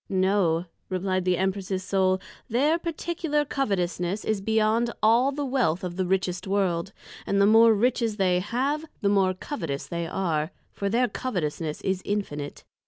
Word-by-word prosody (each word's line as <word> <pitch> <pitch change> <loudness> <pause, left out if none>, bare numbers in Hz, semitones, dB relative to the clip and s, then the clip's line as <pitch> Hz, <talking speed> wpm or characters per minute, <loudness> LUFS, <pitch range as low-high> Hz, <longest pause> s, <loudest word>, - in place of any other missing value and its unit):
No, 185 -3 +2 0.2
replied 185 0 -1
the 180 -1 +2
Empress's 190 0 -1
Soul, 190 -1 +2 0.3
their 290 +8 +2
particular 330 -3 -1
Covetousness, 195 -7 -1
is 215 -2 0
beyond 220 +2 +2
all 235 +5 +5
the 285 +1 -3
wealth 245 -11 +1
of 175 -1 -4
the 185 -1 -1
richest 185 0 -1
World, 190 -2 0 0.4
and 200 - +1
the 200 - +6
more 225 +1 +6
Riches 230 -1 +1
they 180 -2 +3
have, 260 +10 -1 0.2
the 200 - +2
more 190 -2 +3
Covetous 165 - -4
they 170 -1 -3
are; 160 -4 -1 0.2
for 200 - -2
their 245 +4 +2
Covetousness 165 -11 -3
is 190 -1 -1
Infinite. 150 -9 -3
195 Hz, 155 wpm, -26 LUFS, 180-230 Hz, 0.4 s, the